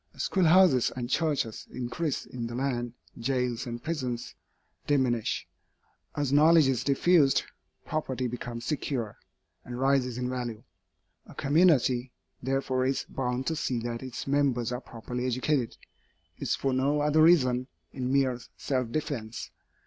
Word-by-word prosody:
As - - -3
schoolhouses 180 -7 +5
and 125 0 -4
churches 145 -9 0
increase 125 +5 -3
in 120 -2 -5
the 120 - -6
land, 120 -2 -2 0.3
jails 125 0 -1
and 120 0 -6
prisons 130 -7 -3 0.5
diminish. 130 -6 +1 0.7
As 145 -2 0
knowledge 155 0 +6
is 130 -3 +1
diffused, 145 0 +4 0.4
property 130 -5 -2
becomes 120 0 -6
secure, 125 -7 -2 0.4
and 120 0 -7
rises 130 -2 +2
in 125 0 -2
value. 120 -3 -4 0.6
A - - -13
community, 140 -5 +3 0.3
therefore, 130 0 0
is 135 - -1
bound 125 0 -2
to 160 - 0
see 130 -5 -1
that 115 0 -4
its 130 -2 -6
members 135 -4 +1
are 125 +1 -3
properly 125 +1 -5
educated, 130 0 0 0.6
if - - -4
for 135 -1 0
no 140 +3 +2
other 150 +1 +3
reason, 130 -7 +4 0.3
in 130 -1 -2
mere 135 -3 +2 0.2
self 130 -4 -1
defence. 120 -6 -4
130 Hz, 135 wpm, -28 LUFS, 120-145 Hz, 0.7 s, knowledge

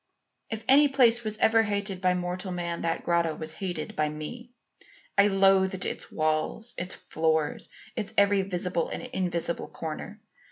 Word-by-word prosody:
"If 225 0 -4
any 285 +3 +7
place 240 -4 +4
was 215 -1 -1
ever 225 +1 +4
hated 200 -3 -2
by 180 -1 +3
mortal 180 +1 -3
man 170 -1 -3
that 165 -1 -1
grotto 170 -2 +1
was 155 0 -4
hated 175 -2 -4
by 150 0 +1
me. 155 +12 -7 0.7
I 200 - +6
loathed 195 -1 +3
its - - -4
walls, 155 +9 -1
its 180 +1 -4
floor, 160 -1 0 0.4
its 215 -4 -3
every 200 0 +5
visible 180 -2 -2
and - - -5
invisible 180 -9 -1
corner. 165 +6 -7
185 Hz, 155 wpm, -27 LUFS, 170-210 Hz, 0.7 s, any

